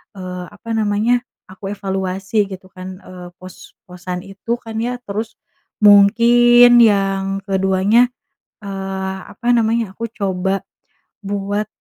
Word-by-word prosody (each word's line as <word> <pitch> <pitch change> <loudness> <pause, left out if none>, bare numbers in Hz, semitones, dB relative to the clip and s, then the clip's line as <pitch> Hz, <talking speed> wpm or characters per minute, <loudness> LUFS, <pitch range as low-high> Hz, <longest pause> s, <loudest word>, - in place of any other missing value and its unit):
eee, 180 -1 -7
apa 205 +3 -13
namanya 220 +3 +1 0.3
aku 195 +1 -9
evaluasi 195 +1 -2
gitu 185 0 -9
kan, 185 +1 -9
eee, 180 -1 -10
pos-posan 180 -1 -9
itu 195 +4 -5
kan 225 -1 -9
ya. 245 +2 -2
Terus 215 +1 -5 0.5
mungkin 240 +4 +6
yang 195 -2 +1
ke-2-nya, 195 +4 +2 0.6
eee, 190 -1 -4 0.2
apa 240 - -8
namanya, 225 -2 0
aku 230 +3 -5
coba 190 -1 -2 0.6
buat, 205 +1 -2
195 Hz, 110 wpm, -18 LUFS, 190-220 Hz, 0.6 s, mungkin